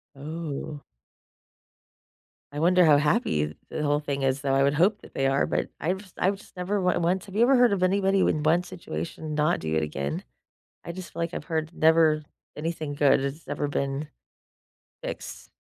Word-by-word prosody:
Oh. 150 0 -6 1.7
I 145 - -4
wonder 180 +1 +5
how 150 -2 +7
happy 80 - +1
the 155 - -4
whole 145 0 +2
thing 140 -2 -3
is, 135 0 +1
though, 135 -1 0
I 135 - +3
would 140 +1 +3
hope 195 +7 +3
that - - -15
they 135 - +1
are, 135 +1 +2
but - - -1
I 170 +5 0
was 190 -1 -10
I 185 - +3
was 200 +1 -6
never 180 +3 -2
w 180 -2 +1
went 180 +2 0
have 195 -1 -11
you 225 - +2
ever 265 +3 +6
heard 245 -4 +5
of 185 - -1
anybody 195 +1 +3
with 155 -4 +1
one 170 +3 +4
situation 155 - -6
not 150 +3 +2
do 80 0 -3
it 80 - +2
again? 70 -2 -3 0.6
I 170 - -5
just 185 +1 -9
feel - - -7
like 170 +1 -2
I've - - -4
heard 160 -2 -2
never 160 -2 +4 0.3
anything 155 -1 -3
good 140 -1 +4
has 140 +4 -4
ever 145 - -2
been 140 +1 -2 1.0
fixed. - - -7
155 Hz, 190 wpm, -26 LUFS, 140-180 Hz, 1.7 s, how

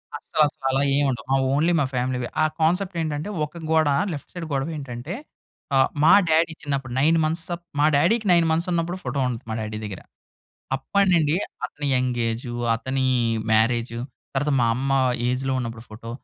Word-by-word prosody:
అస్సలు 155 - -2
అసలు 135 - -11
అలా 135 +1 +1
ఏమి 145 0 +2
ఉండవు. 120 -4 -3
మా 135 - +4 0.2
ఓన్లీ 155 +5 +3
మా 145 - +2
ఫ్యామిలీవే. 125 -1 -1 0.2
ఆ - - +5 0.2
కాన్సెప్ట్ 180 +4 +1
ఏంటంటే 155 +2 -3 0.2
ఒక 165 +3 -11
గోడ 160 -1 +4 0.3
లెఫ్ట్ 145 - -8
సైడ్ 175 -2 -5
గొడవి 140 +4 -1
ఏంటంటే 135 +2 -6 0.6
ఆ! - - +5 0.3
మా 160 - +7 0.2
డ్యాడీ 160 +1 +3
చిన్నప్పుడు 135 -4 -3
9 160 +4 +4
మంత్స్ 160 +2 0 0.3
మా 145 - +5
డ్యాడీకి 205 +9 +2
9 170 -1 +5
మంత్స్ 165 +3 +1
ఉన్నప్పుడు 170 +1 -1
ఫోటో 135 +2 -2
ఉంటది 120 -2 -5
మా 110 - -2
డ్యాడీ 110 0 -4
దగ్గర. 100 -3 -7 0.8
అప్పటి 200 +9 +1
నుండి 155 -1 +3 0.3
అతని 145 0 -5
యంగ్ 125 -1 0
ఏజు, 120 +1 -4 0.2
అతని 130 +3 -2 0.5
మ్యారేజు, 115 +1 +2 0.4
తర్వాత 145 +2 +1
మా 120 - +3
అమ్మ 135 +3 -2 0.4
ఏజ్‌లో 130 +2 -1
ఉన్నప్పుడు 115 -1 -6
ఫోటో 115 +2 -9
140 Hz, 175 wpm, -24 LUFS, 125-160 Hz, 0.8 s, మా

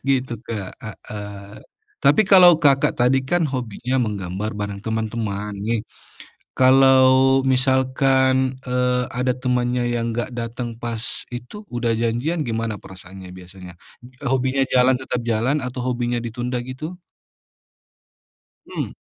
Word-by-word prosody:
Gitu, 130 -2 +1
Kak, 105 -5 -5 0.4
heeh. 105 0 -8 0.4
Tapi 220 - +5
kalau 180 -3 +7
Kakak 140 -4 +3
tadi 125 +2 +3
kan 165 +6 0
hobinya 125 -1 -2
menggambar 100 -2 -3
bareng 100 -1 -4
teman-teman, 110 -2 -3
nih. 115 +1 -1 0.8
Kalau 130 0 +5
misalkan, 130 0 +2
eee, 125 0 +1
ada 125 +1 0
temannya 125 -1 0
yang 115 -1 -1
enggak 120 +2 -3
datang 120 +1 -4
pas 115 -2 -3 0.3
itu 120 - -8 0.2
udah 120 -1 0
janjian, 125 +9 -1
gimana 115 -2 -2
perasaannya 95 0 -12
biasanya? 90 0 -12 0.5
Hobinya 130 +1 +1
jalan 130 +1 +5
tetap 125 -1 -3
jalan 120 +5 +1
atau 125 0 -5
hobinya 120 -1 -1
ditunda 120 +2 -4
gitu? 130 +7 -7 1.7
Hmm. - - -4
125 Hz, 115 wpm, -21 LUFS, 110-130 Hz, 1.7 s, kalau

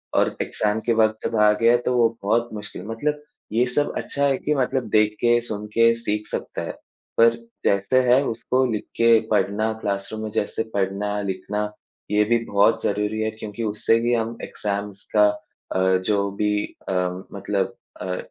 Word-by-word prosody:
और - - +2
एग्ज़ाम 105 +1 -1
के 120 - +3
वक़्त 110 -1 +3
जब 115 - -4
आ 105 0 +7
गया 115 +1 +6
तो 125 - +1
वो 115 -1 +5
बहुत 115 +3 +1
मुश्किल 105 -1 -7
मतलब 150 +6 -2 0.3
ये 120 +3 +3
सब 145 - +1
अच्छा 140 0 -1
है 135 -2 +2
कि 150 - -1
मतलब 130 -1 0
देख 105 0 +3
के, 120 0 +4
सुन 105 -3 -5
के 115 +2 +4
सीख 105 -2 -3
सकता - - -4
है, - - -4 0.5
पर 115 0 +6 0.3
जैसे 100 +6 +3
है 130 +2 +6
उसको 125 +3 0
लिख 105 - -2
के 115 -1 +5
पढ़ना, 110 +1 +1
क्लासरूम 100 +2 -3
में 110 - -3
जैसे 105 +2 -1
पढ़ना-लिखना, 100 +1 -2 0.5
ये 105 0 +4
भी 120 +2 +3
बहुत 100 +2 +3
ज़रूरी 105 +1 0
है 110 0 0
क्योंकि 110 +1 -6
उससे 110 +1 +1
भी 120 +1 +1
हम 115 0 -1
एग्ज़ाम्स 100 -1 -4
का 105 -1 +7 0.5
अ, 95 0 +3
जो 100 -1 +1
भी 105 +1 0 0.2
अ, - - 0 0.4
मतलब 100 0 -2 0.3
अ, 90 0 -2
110 Hz, 175 wpm, -23 LUFS, 105-115 Hz, 0.5 s, आ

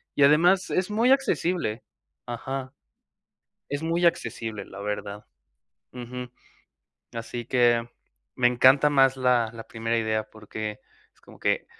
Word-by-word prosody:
Y 140 - +4
además 175 +6 +4
es 185 +2 0
muy 230 +4 +2
accesible. 180 - 0 0.4
Ajá. 130 +3 -5 1.0
Es 145 +2 -3
muy 170 +2 0
accesible, 115 -10 -2
la 95 - -10
verdad. 105 0 -5 0.7
Ujú. 125 0 -7 0.8
Así 120 +1 -5
que 120 -2 +3 0.5
me 125 - +2
encanta 130 +4 +5
más 135 -2 +4
la 125 -3 +2
la 115 -1 -10
primera 115 0 -2
idea 110 -1 -1
porque 105 0 -7 0.3
es - - -30
como - - -16
que - - 0
125 Hz, 125 wpm, -26 LUFS, 115-145 Hz, 1.0 s, encanta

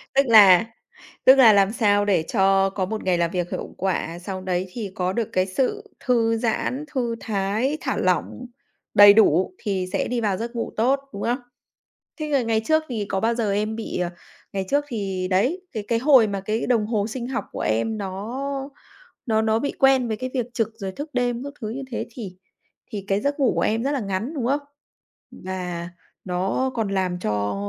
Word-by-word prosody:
Tức 275 - +5
là 210 -4 +7 0.6
tức 260 - +9
là 245 -5 +7
làm 200 0 +4
sao 205 -3 +2
để 190 -6 +2
cho 195 -2 +3
có 190 -1 -2
một 215 +3 -4
ngày 185 -2 +2
làm 170 -1 0
việc 175 -1 -2
hiệu - - -5
quả, 175 -2 -2
sau 185 +1 -6
đấy 185 0 -2
thì 215 -5 -5
có 180 0 -1
được 230 0 -2
cái 185 0 +2
sự 345 - -2
thư 230 -2 +2
giãn, 245 +5 -1
thư 240 -3 -1
thái, 215 +7 -1
thả - - -2
lỏng, 250 - -1 0.5
đầy 205 -1 +9
đủ 185 -4 +4
thì 190 -3 -2
sẽ 195 - 0
đi 245 -1 -1
vào 205 -4 0
giấc 235 +3 -5
ngủ 230 - -3
tốt, 260 +5 +3
đúng 200 - -5
không? 245 +3 0 0.8
Thế 305 - -2
là 280 -3 +2
ngày 225 -1 0
trước 315 +5 +3
thì 220 -5 -3
có 190 - -1
bao 230 +2 +1
giờ 225 -4 0
em 215 +2 -1
bị, 225 - -4
ờ 175 -1 -1 0.4
ngày 195 -1 -2
trước 290 +1 +2
thì, 195 -6 -3
đấy, 255 - +1
cái 215 -2 -4
cái 230 - +2
hồi 260 -2 +6
mà 200 -2 -3
cái 215 +4 -2
đồng 230 -4 +2
hồ 210 -2 0
sinh 240 +1 -5
học 260 - -3
của - - -6
em 165 - 0
nó 255 +9 -4 0.6
nó 220 -2 +2
nó 220 0 +2
bị 285 +4 -2
quen 270 -2 +4
với 220 - -1
cái 255 +3 -5
việc 250 -4 0
trực, 225 -2 0
rồi 195 -4 -6
thức 290 +8 -7
đêm 245 0 -1
các 285 - -6
thứ 220 - -4
như 265 +5 -5
thế, 235 - -3
thì 210 -6 -8 0.6
thì 205 -3 -5
cái 195 +1 +1
giấc 285 +5 -2
ngủ 265 - +3
của - - 0
em 225 +2 +1
rất 280 - 0
là 280 - -1
ngắn, 205 +7 -3
đúng 255 -6 -2
không? 280 +3 +1 0.7
Và 180 -2 -5 0.3
nó 190 +8 -1
còn 225 -4 -1
làm 185 -2 -1
cho 105 - -1
220 Hz, 210 wpm, -23 LUFS, 190-245 Hz, 0.8 s, tức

